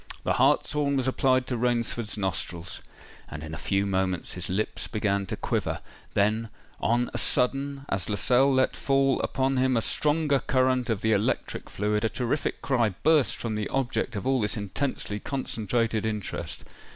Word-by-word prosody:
The -, -, +1 dB
hartshorn 140 Hz, -2 st, +2 dB
was 130 Hz, -1 st, 0 dB
applied 130 Hz, -1 st, +2 dB
to 125 Hz, -, -2 dB
Rainford's 120 Hz, -2 st, 0 dB
nostrils; 90 Hz, -3 st, -2 dB, 0.5 s
and 80 Hz, 0 st, -7 dB
in 80 Hz, 0 st, -7 dB
a -, -, -4 dB
few 100 Hz, +4 st, 0 dB
moments 95 Hz, -2 st, 0 dB
his 90 Hz, -, -3 dB
lips 95 Hz, +4 st, -1 dB
began 100 Hz, -3 st, -1 dB
to -, -, -4 dB
quiver:—then, 110 Hz, +2 st, -2 dB, 0.3 s
on 120 Hz, +2 st, +1 dB
a -, -, 0 dB
sudden, 135 Hz, +2 st, +2 dB
as 95 Hz, 0 st, -1 dB
Lascelles 125 Hz, +6 st, +4 dB
let 130 Hz, -, +2 dB
fall 135 Hz, -1 st, +2 dB
upon 135 Hz, 0 st, 0 dB
him 130 Hz, -1 st, +2 dB
a -, -, +2 dB
stronger 150 Hz, -2 st, +2 dB
current 130 Hz, -1 st, +1 dB
of 110 Hz, -4 st, 0 dB
the 110 Hz, -, +1 dB
electric 100 Hz, +1 st, -1 dB
fluid, 105 Hz, +1 st, -1 dB
a 110 Hz, -, +2 dB
terrific 130 Hz, +6 st, -2 dB
cry 120 Hz, -8 st, +1 dB
burst 155 Hz, -3 st, +4 dB
from 115 Hz, -2 st, -4 dB
the 105 Hz, -1 st, -2 dB
object 135 Hz, -5 st, -1 dB
of 100 Hz, -, -4 dB
all 130 Hz, -2 st, +2 dB
this 105 Hz, +2 st, +1 dB
intensely 105 Hz, 0 st, -3 dB
concentrated 115 Hz, -3 st, -1 dB
interest! 105 Hz, -3 st, -3 dB
115 Hz, 165 wpm, -27 LUFS, 105-130 Hz, 0.5 s, Lascelles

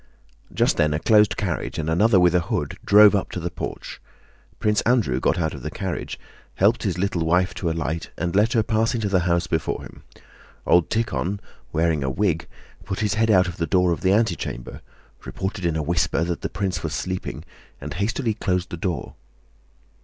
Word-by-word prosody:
Just -, -, +1 dB
then 75 Hz, 0 st, +2 dB
a -, -, -1 dB
closed 105 Hz, +2 st, +4 dB
carriage 90 Hz, -5 st, -3 dB
and 80 Hz, -, -3 dB
another 100 Hz, +5 st, +4 dB
with 90 Hz, -1 st, +4 dB
a 90 Hz, -, +4 dB
hood 85 Hz, -, -3 dB
drove 105 Hz, 0 st, +7 dB
up 100 Hz, -, 0 dB
to -, -, -3 dB
the 85 Hz, 0 st, -4 dB
porch. -, -, -7 dB, 0.6 s
Prince 105 Hz, -1 st, +2 dB
Andrew 110 Hz, -, +2 dB
got 80 Hz, -, +1 dB
out 80 Hz, -2 st, -1 dB
of -, -, -8 dB
the -, -, -4 dB
carriage, -, -, -5 dB, 0.4 s
helped 110 Hz, +5 st, +3 dB
his 95 Hz, -5 st, -1 dB
little 90 Hz, -2 st, 0 dB
wife 90 Hz, +3 st, +2 dB
to 85 Hz, -, -2 dB
alight, 80 Hz, 0 st, -3 dB
and 85 Hz, +2 st, -2 dB
let 105 Hz, +3 st, +3 dB
her 115 Hz, -3 st, +3 dB
pass 110 Hz, +2 st, +1 dB
into 110 Hz, -3 st, -1 dB
the 95 Hz, -2 st, +3 dB
house 85 Hz, 0 st, +2 dB
before 80 Hz, -2 st, -2 dB
him. -, -, -12 dB, 0.6 s
Old 90 Hz, -1 st, +4 dB
Tíkhon, 105 Hz, -4 st, -1 dB, 0.3 s
wearing 80 Hz, -2 st, +1 dB
a 65 Hz, -, -1 dB
wig, 85 Hz, +2 st, 0 dB, 0.4 s
put 95 Hz, -, -4 dB
his 105 Hz, -2 st, +1 dB
head 110 Hz, +1 st, +1 dB
out 95 Hz, -3 st, +5 dB
of 85 Hz, -, -6 dB
the 85 Hz, -, -1 dB
door 90 Hz, +2 st, +3 dB
of 85 Hz, -, -2 dB
the 95 Hz, -, +2 dB
antechamber, 90 Hz, -, -1 dB, 0.4 s
reported 95 Hz, -1 st, -4 dB
in 80 Hz, -, -1 dB
a 80 Hz, -, -1 dB
whisper 85 Hz, +1 st, +1 dB
that 85 Hz, 0 st, -3 dB
the -, -, -3 dB
prince 95 Hz, -5 st, -2 dB
was 80 Hz, -2 st, -3 dB
sleeping, 90 Hz, +2 st, -4 dB, 0.3 s
and -, -, -6 dB
hastily 110 Hz, +5 st, -1 dB
closed 90 Hz, -4 st, -2 dB
the 85 Hz, -, -4 dB
door. 85 Hz, 0 st, -3 dB
90 Hz, 200 wpm, -23 LUFS, 85-105 Hz, 0.6 s, drove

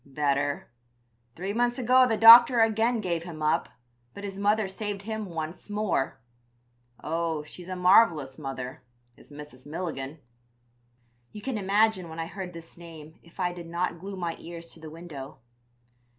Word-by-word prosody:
"'Better. 140 Hz, -1 st, -1 dB, 0.6 s
Three 190 Hz, +4 st, -4 dB
months 240 Hz, +2 st, +1 dB
ago 255 Hz, +1 st, +5 dB
the 225 Hz, -2 st, 0 dB
doctors 230 Hz, +1 st, +9 dB
again 225 Hz, +1 st, 0 dB
gave 170 Hz, -4 st, -1 dB
him 165 Hz, -3 st, -8 dB
up, 150 Hz, -, +1 dB, 0.5 s
but 200 Hz, -, -9 dB
his 195 Hz, -1 st, -6 dB
mother 210 Hz, +1 st, +2 dB
saved 200 Hz, +1 st, -5 dB
him 220 Hz, -1 st, -4 dB
once 165 Hz, +2 st, -6 dB
more. 205 Hz, -, -1 dB, 0.8 s
Oh, 165 Hz, -1 st, -2 dB
she's 175 Hz, +4 st, -12 dB
a 185 Hz, -, -3 dB
marvelous 175 Hz, -7 st, +4 dB
mother, 135 Hz, -3 st, -6 dB, 0.3 s
is -, -, -20 dB
Mrs. 145 Hz, -3 st, -12 dB
Milligan.' 150 Hz, -3 st, -5 dB, 1.1 s
"You 210 Hz, -, -10 dB
can 265 Hz, -3 st, -3 dB
imagine 200 Hz, -2 st, +2 dB
when 160 Hz, +1 st, -8 dB
I 165 Hz, -, -2 dB
heard 185 Hz, 0 st, -7 dB
this 165 Hz, 0 st, -12 dB
name 160 Hz, -2 st, -12 dB
if 170 Hz, +2 st, -21 dB
I 180 Hz, -1 st, 0 dB
did 175 Hz, -1 st, -9 dB
not 170 Hz, 0 st, -2 dB
glue 195 Hz, +3 st, -7 dB
my 170 Hz, -2 st, -3 dB
ears 170 Hz, 0 st, -9 dB
to -, -, -13 dB
the 160 Hz, -1 st, -9 dB
window. 155 Hz, -4 st, -9 dB
175 Hz, 160 wpm, -27 LUFS, 155-205 Hz, 1.1 s, doctors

